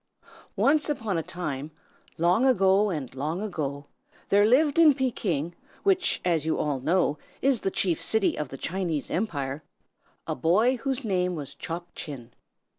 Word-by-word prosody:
ONCE 300 +2 +3
upon 225 -9 -2
a - - -1
time, 155 -4 -5 0.5
long 175 +8 +3
ago 205 -5 +4
and 150 -9 -4
long 150 +6 -3
ago, 145 -9 -4 0.4
there 205 +1 +5
lived 290 +6 +3
in 310 -4 +7
Pekin, 180 - -1 0.3
which, 380 -2 +2
as 165 -4 +2
you 160 - 0
all 145 -3 -1
know, 150 +1 +1 0.2
is 265 -4 +2
the - - 0
chief 180 -3 +1
city 220 -3 +2
of 150 -3 -4
the 135 - -8
Chinese 165 -2 -3
Empire, 145 -8 -2 0.6
a - - -2
boy 210 - +2
whose 265 +1 -2
name 180 -3 0
was 145 -4 -6
Chop 175 +1 -6
Chin. 125 -6 -8
180 Hz, 155 wpm, -26 LUFS, 150-225 Hz, 0.6 s, in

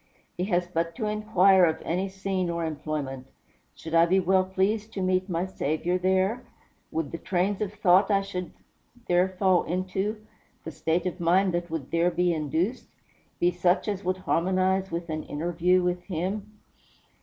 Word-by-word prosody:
He 180 - -2
has 180 -3 +1
but 165 -1 -2
to 225 - -3
inquire 205 -3 +4
of 160 -2 +2
any 185 +4 -1
scene 190 -2 -2
or 170 -1 -2
employment, 145 -4 -4 0.5
"Should 160 - -9
I 165 0 +5
be 190 +2 +3
well 190 +1 +3
pleased 200 +4 -1
to 195 - -3
meet 185 +1 +1
my 175 +1 -1
Saviour 175 0 -1
there? 190 +6 +1 0.5
Would 160 -3 -3
the 165 - -5
trains 190 +2 -1
of 205 -2 -1
thought 195 -1 +4
I 195 -1 +3
should 180 -2 -5 0.6
there 180 +1 +3
fall 185 -1 +2
into, 190 +4 -2 0.4
the 160 - -6
state 165 +3 -1
of 180 - -3
mind 180 +2 +3
that 175 0 -2
would 160 -5 -5
there 170 +1 +3
be 175 0 +1
induced, 160 - -2 0.5
be 175 - +3
such 180 +3 +1
as 205 -1 -2
would 185 +1 0
harmonize 185 +1 +1
with 170 0 -4
an 155 0 -2
interview 175 +4 +1
with 180 0 -1
him?" 195 +4 -3
180 Hz, 170 wpm, -26 LUFS, 170-190 Hz, 0.6 s, I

